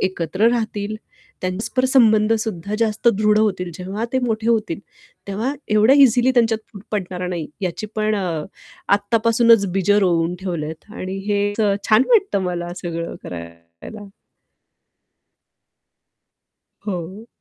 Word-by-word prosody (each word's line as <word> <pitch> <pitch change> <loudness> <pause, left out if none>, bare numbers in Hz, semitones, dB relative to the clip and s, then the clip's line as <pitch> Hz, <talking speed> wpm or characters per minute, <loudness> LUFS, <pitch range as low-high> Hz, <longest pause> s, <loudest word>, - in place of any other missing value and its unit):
एकत्र 185 +3 +1
राहतील, 215 -3 -2 0.4
त्यां 185 0 -1
परस्पर 245 +6 -2
संबंध 225 -4 +4
सुद्धा 200 -1 -4
जास्त 220 0 +1
दृढ 215 -1 +3
होतील. 185 -5 0
जेव्हा 195 +5 -4
ते 260 - +2
मोठे 230 -2 -1
होतील, 215 -7 +1 0.5
तेव्हा 225 +8 -2 0.2
एवढ्या 215 +6 +5
इझिली 245 +1 +3
त्यांच्यात 225 -2 0
पडणार 180 -3 -3
नाही 170 -4 -3
याची 185 +3 -3
पण 215 0 +1
अ, 175 -6 -2 0.5
आत्तापासूनच 230 +1 +3
बीजं 195 +2 +2
रोवून 170 0 +1
ठेवल्यात 165 +1 -5
आणि 190 -3 -5
हे 205 0 +1
असं 205 -1 +1
छान 215 +2 +6
वाटतं 395 - +3
मला 175 -1 -3
सगळं 170 -1 -4
करायला. 85 - -10 2.8
हो. 190 +3 -5
205 Hz, 120 wpm, -20 LUFS, 180-225 Hz, 2.8 s, छान